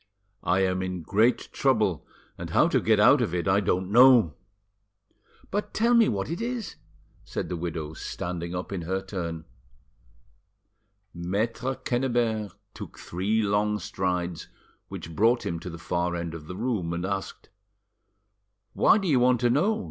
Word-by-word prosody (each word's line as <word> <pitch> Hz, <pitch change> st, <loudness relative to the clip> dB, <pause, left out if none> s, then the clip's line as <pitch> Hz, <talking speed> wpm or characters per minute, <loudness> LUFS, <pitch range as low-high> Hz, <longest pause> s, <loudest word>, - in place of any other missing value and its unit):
I 90 Hz, +2 st, +2 dB
am 95 Hz, -1 st, +1 dB
in 90 Hz, -2 st, -4 dB
great 110 Hz, +9 st, +2 dB
trouble, -, -, +1 dB, 0.3 s
and -, -, -7 dB
how -, -, +4 dB
to -, -, +2 dB
get -, -, +3 dB
out -, -, +6 dB
of 85 Hz, -, -1 dB
it 85 Hz, +2 st, -2 dB
I 95 Hz, +1 st, +4 dB
don't 95 Hz, -1 st, -1 dB
know." 120 Hz, -, +7 dB, 1.2 s
"But 205 Hz, +2 st, -3 dB
tell 235 Hz, +2 st, +3 dB
me 235 Hz, -2 st, +5 dB
what 100 Hz, -2 st, -2 dB
it 170 Hz, +7 st, -4 dB
is," 235 Hz, -3 st, -4 dB, 0.5 s
said -, -, -5 dB
the 90 Hz, -, -2 dB
widow, 80 Hz, -2 st, -4 dB
standing 85 Hz, +1 st, -5 dB
up 90 Hz, +2 st, -5 dB
in 95 Hz, -3 st, -3 dB
her 95 Hz, +3 st, -2 dB
turn. 85 Hz, -4 st, -5 dB, 1.7 s
Maitre 110 Hz, +9 st, -2 dB
Quennebert 120 Hz, -6 st, -1 dB, 0.2 s
took -, -, -9 dB
three 105 Hz, +5 st, -1 dB
long 105 Hz, +1 st, +1 dB
strides, 90 Hz, -4 st, -3 dB, 0.4 s
which 80 Hz, -1 st, -8 dB
brought 115 Hz, +5 st, +3 dB
him 85 Hz, 0 st, -2 dB
to 90 Hz, -, -7 dB
the 85 Hz, -, -8 dB
far 85 Hz, +1 st, -2 dB
end 85 Hz, -1 st, -4 dB
of 80 Hz, -2 st, -9 dB
the 90 Hz, -, -6 dB
room, 105 Hz, -8 st, -1 dB
and 85 Hz, +1 st, -3 dB
asked— 95 Hz, 0 st, -5 dB, 1.2 s
"Why -, -, +5 dB
do 195 Hz, -3 st, -2 dB
you 140 Hz, -6 st, +3 dB
want 125 Hz, 0 st, +3 dB
to 120 Hz, -1 st, +3 dB
know? 200 Hz, -, +2 dB
95 Hz, 160 wpm, -26 LUFS, 85-120 Hz, 1.7 s, know